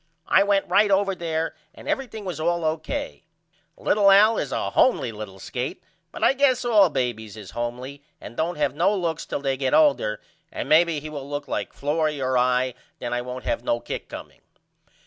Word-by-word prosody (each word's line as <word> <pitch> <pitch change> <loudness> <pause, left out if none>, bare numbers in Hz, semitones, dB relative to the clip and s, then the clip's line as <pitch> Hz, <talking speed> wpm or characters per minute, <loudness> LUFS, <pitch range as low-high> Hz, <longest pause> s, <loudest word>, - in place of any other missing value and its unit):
I - - +5
went 200 0 +2
right 210 +1 +4
over 195 0 +2
there 165 -2 -2 0.2
and - - -12
everything 225 -6 -3
was 175 -5 -4
all 170 +1 0
O.K. 165 - -3 0.5
Little 210 - +3
Al 210 +3 +6
is - - -3
a - - -2
homely 250 - +3
little 105 -3 -8
skate 125 - -5 0.3
but - - -6
I - - +5
guess 265 -2 +2
all 210 -6 +5
babys 115 -6 -3
is 105 -4 -10
homely 125 +4 -5 0.2
and 120 - -10
don't 165 +5 -1
have 145 -3 0
no 180 +7 +2
looks 165 -4 -2
till - - -3
they 135 -1 -1
get 130 -1 +1
older 280 - +3 0.3
and - - -5
maybe 165 0 +4
he 155 +2 -8
will 140 -2 -7
look 145 0 -4
like - - -3
Florrie 150 +1 -1
or 130 -1 0
I 125 0 +2 0.2
then 120 -1 -4
I 120 - 0
won't 125 +1 -7
have 115 - -2
no 120 -1 0
kick - - -6
comeing. - - -10
155 Hz, 195 wpm, -24 LUFS, 125-195 Hz, 0.5 s, Al